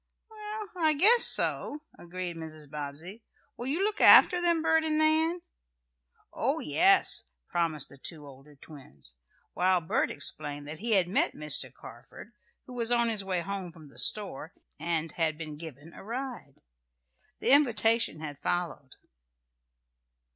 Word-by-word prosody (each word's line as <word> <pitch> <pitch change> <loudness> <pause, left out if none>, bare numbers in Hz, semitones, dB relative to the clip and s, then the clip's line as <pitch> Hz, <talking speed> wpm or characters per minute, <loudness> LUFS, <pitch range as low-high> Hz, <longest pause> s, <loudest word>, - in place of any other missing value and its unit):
"Well, 425 -1 -7
I 315 -3 +3
guess 440 +10 +6
so," 295 +1 +1
agreed 175 0 -6
Mrs. 155 -2 -9
Bobbsey, 150 +8 -7 0.3
"Will 240 - -6
you 320 +8 +1
look 425 +1 -1
after 355 -1 +7
them, 340 -2 +1
Bert 320 0 +3
and 310 -1 0
Nan?" 320 +3 +1 0.9
"Oh, - - -1
yes," - - +4 0.2
promised 165 -4 -1
the 140 - -15
two 155 0 -6
older 140 +1 -15
twins, 70 - -10 0.4
while 185 0 +2
Bert 160 - -1
explained 145 -1 -4
that 150 +1 -8
he 225 +2 -1
had 190 -4 +3
met 180 - 0
Mr. 150 -4 0
Carford, 120 - -13 0.3
who 255 - -11
was 235 -1 -2
on 235 -1 +2
his 215 -3 -2
way 185 -2 -2
home 190 -1 -5
from 160 -3 -15
the - - -9
store, 195 -4 0 0.2
and 165 0 -2
had 160 -2 -1
been 155 -2 -7
given 155 0 -11
a - - -12
ride. 240 - -7 0.8
The - - 0
invitation 230 - +3
had 145 -2 -8
followed. 170 -6 -3
180 Hz, 145 wpm, -28 LUFS, 150-255 Hz, 0.9 s, after